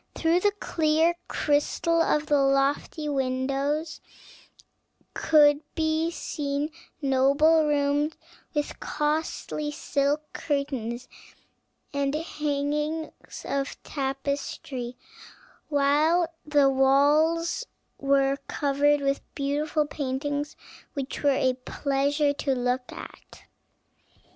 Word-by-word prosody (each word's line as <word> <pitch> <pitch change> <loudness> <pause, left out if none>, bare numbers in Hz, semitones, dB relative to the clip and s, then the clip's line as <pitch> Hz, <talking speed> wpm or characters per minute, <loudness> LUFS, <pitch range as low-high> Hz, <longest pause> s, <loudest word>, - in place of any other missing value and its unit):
Through 330 +2 +2
the 410 +2 +3
clear 320 +1 +2
crystal 330 +3 +1
of 300 -2 +2
the 290 -2 +3
lofty 275 +3 +1
windows 275 +3 -1 1.1
could 295 -2 +5
be 315 +1 +1
seen 295 -2 -3 0.3
noble 280 +4 +4
rooms, 290 +1 +1 0.4
with 295 0 -2
costly 300 0 -2
silk 290 0 0
curtains 260 -5 -2 0.9
and 280 0 0
hangings 300 0 -3
of 275 0 -2
tapestry; 270 -2 -4 0.7
while 310 +4 +3
the 290 -2 +4
walls 295 - +3 0.3
were 275 0 +2
covered 290 +1 +2
with 275 0 0
beautiful 295 +2 0
paintings 290 +1 -3 0.4
which 275 -1 -4
were 285 - +4
a 260 -2 +2
pleasure 285 +2 +1
to 280 -1 -1
look 250 0 -1
at. - - -11
290 Hz, 90 wpm, -26 LUFS, 275-305 Hz, 1.1 s, could